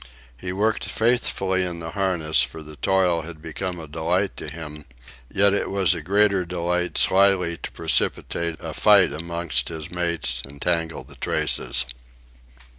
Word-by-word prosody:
He 90 +9 -5
worked 105 +4 0
faithfully 100 -5 +1
in 90 -2 -4
the 80 0 -6
harness, 85 -8 +1
for 65 +6 -3
the 75 0 -10
toil 90 0 +2
had 80 0 -9
become 85 +3 -5
a 80 - -8
delight 85 +6 -1
to - - -6
him; 75 -2 -8 0.5
yet 100 0 +4
it 100 - 0
was 95 -4 +2
a 85 - -4
greater 100 +2 +2
delight 90 0 -1
slyly 95 -3 +4
to - - -7
precipitate 85 -1 0
a 80 -3 -6
fight 100 -3 +5
amongst 85 -5 -2
his 80 -2 -7
mates 85 -8 -1
and 70 +1 -10
tangle 85 -1 -1
the - - -14
traces. - - +1
85 Hz, 155 wpm, -23 LUFS, 80-95 Hz, 0.5 s, fight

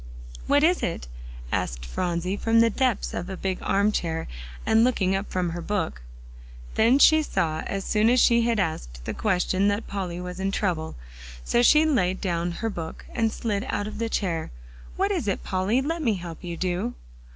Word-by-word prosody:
"What 285 +1 +4
is 350 +3 +3
it?" 75 - -3 0.4
asked - - -2
Phronsie, 175 - -2
from 225 +2 +2
the 230 0 +5
depths 255 -2 0
of 175 - -4
a 190 - -5
big 190 0 -2
arm 200 +2 +2
chair, 165 -5 -2 0.4
and 220 +1 +4
looking 195 -7 +2
up 195 +1 -3
from 180 -2 -1
her 175 +1 -5
book. 170 - -2 0.7
Then 235 +4 +4
she 315 +2 +7
saw 160 - -1
as 195 -1 -3
soon 215 +1 +3
as 250 +1 +4
she 235 -1 +5
had 230 -2 +1
asked - - -3
the - - -3
question 190 -1 +1
that 205 +2 0
Polly 185 -3 -4
was 180 +1 -6
in 195 0 0
trouble, 175 -6 -1 0.5
so 240 - +2
she 305 +5 +6
laid 190 - +1
down 175 -2 -1
her - - +1
book, 165 -4 -7
and 225 -2 +1
slid 210 -3 -2
out 205 - -1
of 215 - -6
the 230 -1 -1
chair. 170 -7 -1 0.5
"What 390 +2 +1
is 345 - -1
it, 200 - -1
Polly? 195 +6 +1
Let 330 +3 -2
me 230 -8 +2
help 175 -2 -8
you, 170 -1 -5
do." 185 +7 -2
195 Hz, 195 wpm, -25 LUFS, 175-230 Hz, 0.7 s, she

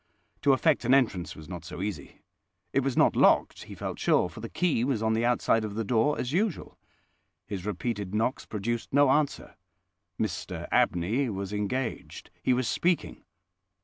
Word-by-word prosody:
To 140 - +4
effect 150 +1 +2
an 125 +3 +5
entrance 110 -10 0
was 80 -1 -11
not 90 -1 -7
so - - -8
easy. 95 -8 -6 0.5
It - - +3
was 135 -2 -1
not - - +4
locked, - - +3
he - - -10
felt - - -5
sure, 90 - +2
for 85 - -11
the 115 +1 -6
key 170 -10 +1
was 125 -4 0
on 110 0 +2
the 115 +1 +1
outside 120 -2 +2
of 105 -1 -5
the 115 - -1
door 115 +7 +2
as 125 - -3
usual. 190 +3 -1 0.7
His 100 -1 -5
repeated 105 0 -3
knocks 115 +4 -1
produced 115 +3 -3
no 140 -1 +5
answer. 145 0 0 0.7
Mr - - -3
Abney 110 +10 +2
was 100 -1 -4
engaged: 115 +5 -4
he - - +1
was 125 -1 +1
speaking. 175 +7 0
115 Hz, 175 wpm, -28 LUFS, 100-135 Hz, 0.7 s, an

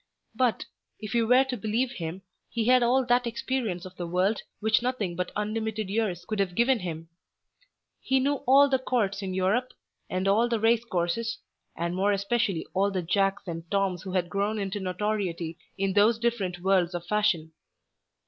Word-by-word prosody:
But, 250 -3 +1 0.3
if 215 -2 -6
you 230 -1 +2
were 250 +3 +6
to 265 -1 -4
believe 230 +3 -1
him, 180 -4 -6 0.3
he 230 -2 -1
had 255 +1 +5
all 250 +2 +3
that 245 0 +2
experience 225 -7 -2
of 185 0 -11
the 175 - -4
world 185 +5 +1 0.2
which 220 +1 +2
nothing 235 -8 -2
but 180 +1 -3
unlimited 215 -1 -2
years 195 -5 -1
could 215 +1 -3
have 185 -3 0
given 240 +3 +3
him. 165 -3 -6 0.9
He 265 0 +2
knew 280 +2 +1
all 275 +2 +7
the 265 -2 +1
Courts 210 -6 0
in 190 -1 -4
Europe, 210 +7 +1 0.4
and 185 +1 -1
all 220 +5 +3
the 230 -2 0
race 225 +1 +3
courses, 225 +4 -1 0.4
and 170 +1 -2
more 200 +2 +2
especially 200 -3 0
all 195 +2 +2
the 185 -2 -2
Jacks 195 +3 +1
and 165 -2 -6
Toms 195 -3 0
who 190 -1 -7
had 180 -2 +1
grown 205 +3 -1
into 200 0 -3
notoriety 185 -3 -2 0.2
in 195 0 0
those 210 +3 +4
different 215 -7 -1
worlds 185 -2 +2
of 175 0 -5
fashion. 195 -5 +1
205 Hz, 180 wpm, -27 LUFS, 185-235 Hz, 0.9 s, all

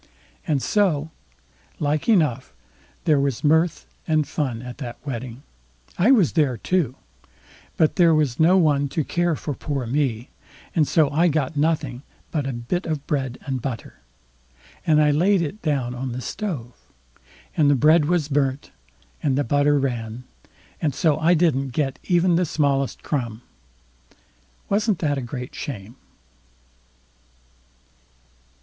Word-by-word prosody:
And 145 -4 +1
so, 160 -7 +1 0.7
like 150 +6 0
enough, 150 - +2 0.5
there 150 -4 +4
was 140 -4 -1
mirth 160 +2 +2 0.2
and 155 -2 +2
fun 125 -6 -3
at 125 +1 -8
that 120 -4 -6
wedding. 125 -1 -6 0.5
I 195 +8 +3
was 215 - +5
there 145 -7 +1
too; 150 - 0 0.8
but 160 +3 +2
there 170 -3 +5
was 145 -6 0
no 175 +4 +5
one 145 -5 +2
to 155 +3 -1
care 175 +2 0
for 145 - -4
poor 135 -1 -3
me; 125 -2 -1 0.5
and 155 -4 +3
so 155 -4 +3
I 165 +4 +3
got 155 -2 0
nothing 145 -4 0 0.3
but 145 -4 -1
a - - -1
bit 120 +10 -3
of 155 -3 -3
bread 130 -4 -2
and 130 -3 -3
butter, 120 -4 -6 0.9
and 155 -1 +5
I 150 -1 +4
laid 180 +5 +3
it 195 +8 -5
down 135 -6 -1
on 125 0 -4
the 125 - -5
stove, 135 - -5 0.8
and 150 -2 +4
the 145 - +5
bread 150 +4 +5
was 170 -2 +1
burnt 140 -2 -1 0.5
and 135 -3 +1
the 145 - +2
butter 145 +3 +2
ran, 120 -3 -3 0.6
and 145 -5 0
so 155 -2 +2
I 170 +3 +4
didn't 140 -6 +1
get 135 -1 -1
even 175 -1 +3
the 180 - +2
smallest 140 -3 0
crumb. 120 -5 -3 1.2
Wasn't 210 -1 +1
that 145 -4 0
a - - -4
great 125 0 -6
shame? 115 -5 -7
145 Hz, 145 wpm, -23 LUFS, 130-160 Hz, 1.2 s, was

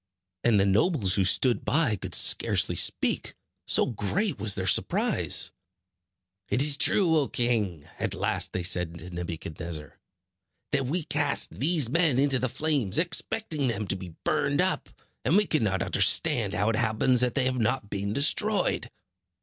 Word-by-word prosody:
And 115 -4 +3
the 95 - +3
nobles 105 - +2
who 100 - +2
stood 120 +6 +1
by 140 -7 +2
could 95 -3 -3
scarcely - - +3
speak, - - -1 0.3
so - - +2
great 135 - -2
was 105 -1 +1
their 95 - -3
surprise. 95 - 0 1.0
"It - - 0
is 145 -1 +5
true, 165 +3 +2
O 140 - -1
king," 105 -10 -1
at - - -2
last - - -1
they 90 - -3
said 90 -1 -1
to 90 +2 -11
Nebuchadnezzar, 85 -2 -7 0.7
"that 135 -3 +1
we 165 +5 -1
cast 145 -1 0
these 155 -2 +1
men 160 0 +2
into 135 -1 +2
the 130 - -1
flames, 135 -5 0
expecting 165 -2 -1
them 105 -3 -3
to - - 0
be 90 -4 -9
burned - - 0
up; - - 0 0.3
and 175 - +3
we 210 - +3
cannot 105 - 0
understand - - +2
how 105 +5 +1
it 110 - -2
happens 120 +2 +1
that 125 -2 0
they 135 -3 +1
have 130 0 -1
not 110 -2 -1
been 100 0 -3
destroyed." 170 - +1
120 Hz, 160 wpm, -26 LUFS, 95-145 Hz, 1.0 s, is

